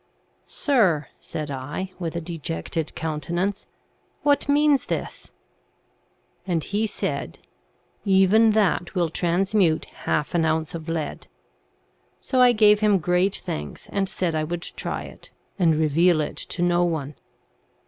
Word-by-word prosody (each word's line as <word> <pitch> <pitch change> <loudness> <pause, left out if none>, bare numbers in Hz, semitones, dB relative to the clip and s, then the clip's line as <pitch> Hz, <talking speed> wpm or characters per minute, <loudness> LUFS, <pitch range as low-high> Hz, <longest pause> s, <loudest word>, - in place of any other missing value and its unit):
' - - -42
Sir,' 185 - +1
said 150 -2 -6
I, 145 +8 -5
with 170 -2 -4
a 170 - -2
dejected 160 - -4
countenance, 170 +5 -2 0.3
* - - -41
what 285 -1 +2
means 290 -1 +3
this? - - -4 0.6
' - - -40
And 170 -4 0
he 210 +2 -1
said, - - -4 0.4
* - - -41 0.2
Even 205 +3 +5
that 200 -4 +1
will 175 -2 +1
transmute 175 0 +1
half 150 - -3
an 170 -2 +2
ounce 160 0 0
of 165 -1 -6
lead.' 160 -2 -4 0.9
So 260 -2 +1
I 250 -1 +7
gave 210 -2 +5
him 210 -2 +4
great 180 +3 +1
thanks, 75 0 -5
and 195 -1 0
said 175 -3 -1
I 155 -1 0
would 170 +2 -4
try - - -4
it, - - -12 0.3
and 165 -4 +4
reveal 160 +2 +3
it 150 - -2
to 175 - -3
no 175 0 +3
one. 155 -4 -2
175 Hz, 150 wpm, -24 LUFS, 160-200 Hz, 0.9 s, I